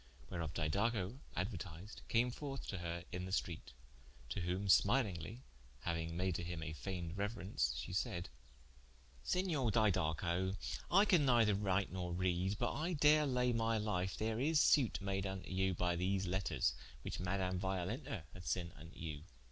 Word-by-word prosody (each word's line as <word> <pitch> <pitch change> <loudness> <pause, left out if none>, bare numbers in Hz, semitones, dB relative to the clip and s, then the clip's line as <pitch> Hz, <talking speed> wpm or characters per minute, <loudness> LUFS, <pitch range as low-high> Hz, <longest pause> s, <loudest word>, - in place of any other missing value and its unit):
Whereof 85 -3 -3
Didaco 100 - 0 0.2
aduertised, 95 0 -4
came 120 +2 +3
forth 135 +1 -5
to 95 - -3
her 85 0 -4
into 90 +1 -3
the - - -6
streate, 90 -3 -2 0.6
to 75 - -2
whom 90 +3 -1
smilingly 110 0 +3 0.4
(hauing 80 -1 -1
made 90 0 +1
to 85 - -4
him 85 -2 -4
a 80 -1 -4
fayned 85 +3 -4
reuerence) 100 -1 -1
she - - -5
said: 85 +1 -1 0.9
"Senior 165 - +1
Didaco, 95 -3 +2 0.3
I 195 +4 +6
can 180 -8 +5
neither 115 -4 +5
write 100 -1 +1
nor 90 -1 -3
reade, 90 +2 +1
but - - 0
I 165 +5 -1
dare 150 0 +5
laie 125 -2 +2
my 115 0 +2
life, 95 -4 0
ther 110 +1 -1
is 150 +4 +3
sute 135 -6 +4
made 100 -1 -1
vnto 95 -2 -4
you 95 0 +2
by 90 0 +1
these 95 +2 0
letters, 95 +2 +1 0.3
which - - -4
Madame 90 0 0
Violenta 95 - -2
hath 90 -1 -10
sent 85 -2 -1
vnto 80 - -11
you. 75 -3 -5
95 Hz, 160 wpm, -38 LUFS, 90-115 Hz, 0.9 s, I